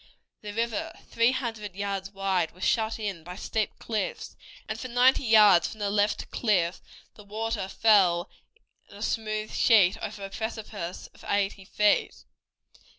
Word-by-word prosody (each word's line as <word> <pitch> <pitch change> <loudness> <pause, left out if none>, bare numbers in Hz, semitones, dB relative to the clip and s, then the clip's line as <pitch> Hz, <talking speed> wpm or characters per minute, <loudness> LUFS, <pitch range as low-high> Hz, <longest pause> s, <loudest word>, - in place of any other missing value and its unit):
The 210 - -7
river, 230 0 -2 0.2
three 230 +2 +3
hundred 225 -7 -4
yards 195 -1 -3
wide, 195 -4 -1
was 185 - -9
shut 220 -1 +1
in 200 -7 -4
by 180 +2 -8
steep 215 +2 -2
cliffs, 445 - -4 0.3
and - - -4
for 255 - -5
ninety 250 +2 +4
yards 210 -6 +6
from 220 - -10
the 200 -1 -1
left 205 0 0
cliff 185 -7 0 0.3
the 210 - -14
water 215 0 -3
fell 195 -4 +3 0.6
in 200 - -13
a 205 - -6
smooth 215 -2 -2
sheet 200 -6 +4
over 200 - -5
a 195 - -9
precipice 215 -5 -5
of - - -18
eighty 200 -1 -1
feet. 210 +1 +1
210 Hz, 150 wpm, -27 LUFS, 195-225 Hz, 0.6 s, yards